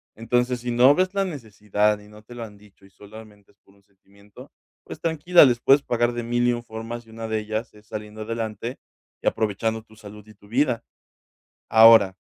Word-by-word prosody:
Entonces, 125 Hz, +2 st, -1 dB
si 125 Hz, -, -5 dB
no 125 Hz, +4 st, +6 dB
ves 185 Hz, +1 st, 0 dB
la 195 Hz, 0 st, +1 dB
necesidad 105 Hz, -, -1 dB
y 105 Hz, 0 st, -17 dB
no 105 Hz, 0 st, -15 dB
te 120 Hz, +3 st, -13 dB
lo 120 Hz, -, -6 dB
han 105 Hz, -2 st, -11 dB
dicho 100 Hz, -1 st, -21 dB
y 95 Hz, -, -21 dB
solamente 105 Hz, 0 st, -15 dB
es -, -, -45 dB
por 100 Hz, -, -25 dB
un 100 Hz, -, -27 dB
sentimiento, 100 Hz, +1 st, -18 dB, 0.3 s
pues -, -, -10 dB
tranquila, 165 Hz, +2 st, +4 dB
les 120 Hz, -3 st, +2 dB
puedes 140 Hz, +2 st, +5 dB
pagar 120 Hz, -1 st, 0 dB
de 120 Hz, -, -4 dB
mil 120 Hz, +1 st, 0 dB
y 120 Hz, -, +3 dB
un 120 Hz, 0 st, -5 dB
formas, 115 Hz, +1 st, -8 dB
y -, -, -16 dB
una 115 Hz, 0 st, -7 dB
de 110 Hz, 0 st, -1 dB
ellas 110 Hz, +2 st, -5 dB
es 105 Hz, 0 st, -20 dB
saliendo 105 Hz, 0 st, -8 dB
adelante 115 Hz, +1 st, -5 dB, 0.5 s
y -, -, -3 dB
aprovechando 110 Hz, +1 st, -1 dB
tu 110 Hz, -1 st, -21 dB
salud 105 Hz, 0 st, -13 dB
y 110 Hz, -, -16 dB
tu 100 Hz, -, -21 dB
vida. 120 Hz, 0 st, 0 dB, 0.9 s
Ahora 110 Hz, -3 st, +7 dB
110 Hz, 210 wpm, -23 LUFS, 105-120 Hz, 0.9 s, Ahora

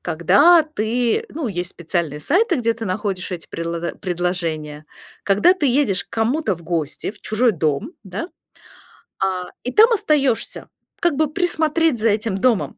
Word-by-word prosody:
когда 285 Hz, -, +5 dB
ты, 245 Hz, -, -1 dB
ну, 295 Hz, -5 st, -4 dB
есть 175 Hz, -2 st, -3 dB
специальные 170 Hz, -4 st, -3 dB
сайты, 370 Hz, -, +2 dB
где 230 Hz, -3 st, +1 dB
ты 225 Hz, -1 st, -6 dB
находишь 190 Hz, -1 st, -3 dB
эти 175 Hz, -3 st, -6 dB
предло 170 Hz, 0 st, -4 dB
предложения. 165 Hz, -5 st, -3 dB, 0.4 s
Когда 205 Hz, -, +4 dB
ты 370 Hz, -6 st, -1 dB
едешь 240 Hz, -, +2 dB
к -, -, -50 dB
кому-то 235 Hz, +1 st, 0 dB
в 170 Hz, -, -15 dB
гости, 160 Hz, -1 st, -3 dB
в 210 Hz, -, -18 dB
чужой 225 Hz, +2 st, +1 dB
дом, 160 Hz, -, -1 dB
да. 200 Hz, -, -6 dB, 0.9 s
А, 185 Hz, -1 st, -1 dB, 0.2 s
и 250 Hz, -, -3 dB
там 445 Hz, +2 st, +6 dB
остаешься, 300 Hz, -, 0 dB, 0.3 s
как 345 Hz, -4 st, +1 dB
бы 310 Hz, +2 st, +2 dB
присмотреть 325 Hz, -5 st, +1 dB
за 225 Hz, +1 st, +2 dB
этим 210 Hz, -1 st, 0 dB
домом. 230 Hz, -1 st, +1 dB
215 Hz, 155 wpm, -20 LUFS, 175-290 Hz, 0.9 s, там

